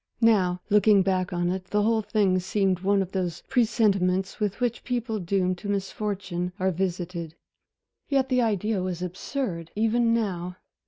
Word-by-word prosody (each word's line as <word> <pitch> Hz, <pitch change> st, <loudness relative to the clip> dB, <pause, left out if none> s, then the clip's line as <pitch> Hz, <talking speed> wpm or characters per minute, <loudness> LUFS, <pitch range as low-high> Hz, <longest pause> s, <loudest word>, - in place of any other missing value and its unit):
Now, 190 Hz, -6 st, +3 dB
looking 210 Hz, -1 st, +5 dB
back 185 Hz, -1 st, 0 dB
on 175 Hz, 0 st, 0 dB
it, 185 Hz, 0 st, -4 dB
the 210 Hz, +2 st, 0 dB
whole 225 Hz, +1 st, +2 dB
thing 200 Hz, -3 st, +2 dB
seemed 190 Hz, 0 st, 0 dB
one 195 Hz, +1 st, +2 dB
of 185 Hz, -, -10 dB
those 180 Hz, -3 st, -3 dB
presentiments 195 Hz, -6 st, +1 dB
with 210 Hz, -1 st, -1 dB
which 245 Hz, -2 st, -1 dB
people 240 Hz, -3 st, -2 dB
doomed 185 Hz, 0 st, 0 dB
to 205 Hz, -, -6 dB
misfortune 195 Hz, -3 st, -3 dB
are 190 Hz, +1 st, +2 dB
visited. 175 Hz, -2 st, -3 dB, 0.7 s
Yet 270 Hz, -2 st, +2 dB
the 255 Hz, -1 st, +3 dB
idea 215 Hz, -2 st, 0 dB
was 180 Hz, -1 st, -3 dB
absurd, 180 Hz, -, -4 dB
even 230 Hz, +2 st, +2 dB
now. 180 Hz, -6 st, -1 dB
195 Hz, 155 wpm, -26 LUFS, 180-220 Hz, 0.7 s, looking